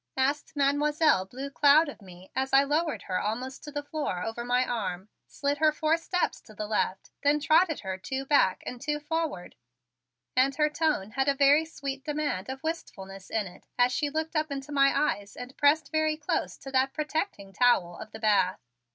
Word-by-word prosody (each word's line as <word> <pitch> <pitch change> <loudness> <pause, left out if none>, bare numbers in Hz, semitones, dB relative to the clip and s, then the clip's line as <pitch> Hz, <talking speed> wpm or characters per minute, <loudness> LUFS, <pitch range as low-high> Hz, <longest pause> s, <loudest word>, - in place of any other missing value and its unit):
asked 285 +4 0
Mademoiselle 290 - +3
Blue 265 +7 -7
Cloud 295 +3 +5
of 285 - -9
me 185 -1 -14
as 265 +1 -1
I 270 +1 +7
lowered 305 +3 -1
her 185 -1 -2
almost 250 +5 -4
to 295 - -8
the 290 0 -4
floor 285 - -3
over 225 +2 -4
my 245 +1 +2
arm, 195 -5 -3 0.2
slid 285 0 -2
her 310 -1 +5
four 310 +1 +1
steps 360 +2 -1
to 215 - -16
the 210 - -4
left 210 -3 -2
then 290 +1 +3
trotted 315 +2 +3
her 190 -1 -4
two 265 +7 -4
back 270 -10 +3
and 245 -1 -6
two 295 +1 -1
forward; 300 - -3 0.8
and 265 +2 +3
her 300 +1 +2
tone 300 -11 0
had 270 +5 0
a 280 - +3
very 285 +3 +5
sweet 275 -4 -6
demand 290 -9 -2
of 265 0 -6
wistfulness 195 - -6
in 220 -2 -1
it 180 - -13
as 245 0 +4
she 290 +3 0
looked 315 +2 -3
up 310 0 +1
into 275 +1 -5
my 275 -1 +5
eyes 205 -9 -1
and 250 +2 -9
pressed 295 +2 +3
very 310 -1 +1
close 300 - -2
to 270 - -9
that 265 0 +2
protecting 305 - -3
towel 195 -9 +3
of 215 - -9
the - - -8
bath. 205 -4 +2
275 Hz, 195 wpm, -28 LUFS, 220-300 Hz, 0.8 s, I